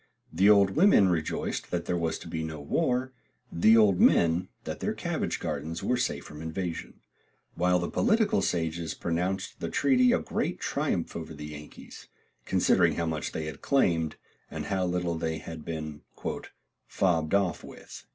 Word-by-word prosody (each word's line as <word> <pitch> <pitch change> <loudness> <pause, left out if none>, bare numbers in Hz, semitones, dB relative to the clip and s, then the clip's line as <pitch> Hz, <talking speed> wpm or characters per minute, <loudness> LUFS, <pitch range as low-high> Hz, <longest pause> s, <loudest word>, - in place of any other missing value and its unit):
The 95 +5 +4
old 100 -2 +6
women 155 - +5
rejoiced 80 -3 -2
that - - -2
there 90 - -1
was 85 -2 -1
to - - -11
be 80 - -3
no 80 -1 -5
war, 130 - 0 0.4
the 110 +7 +5
old 100 -5 +5
men 85 +2 +4
that - - -5
their - - -2
cabbage - - -2
gardens 80 +1 -4
were 125 - +1
safe 75 -13 -2
from 75 +1 -10
invasion; 85 +1 -5 0.5
while 90 0 +2
the 85 -1 -2
political 220 - +2
sages 80 -2 -2
pronounced 90 +3 -2
the - - -3
treaty 125 -3 +3
a - - +4
great - - -2
triumph - - -2
over 80 -1 -6
the 75 0 -8
Yankees, 75 0 -11 0.4
considering - - +3
how 85 - -1
much 80 -2 -3
they 80 - -4
had 80 - -7
claimed, 85 - +1 0.3
and - - -5
how 95 -2 0
little 90 -2 -1
they 80 -1 -2
had 80 0 -8
been 75 -2 -5 0.9
"fobbed 85 -2 +1
off 100 -3 0
with." - - -11
85 Hz, 165 wpm, -28 LUFS, 80-100 Hz, 0.9 s, old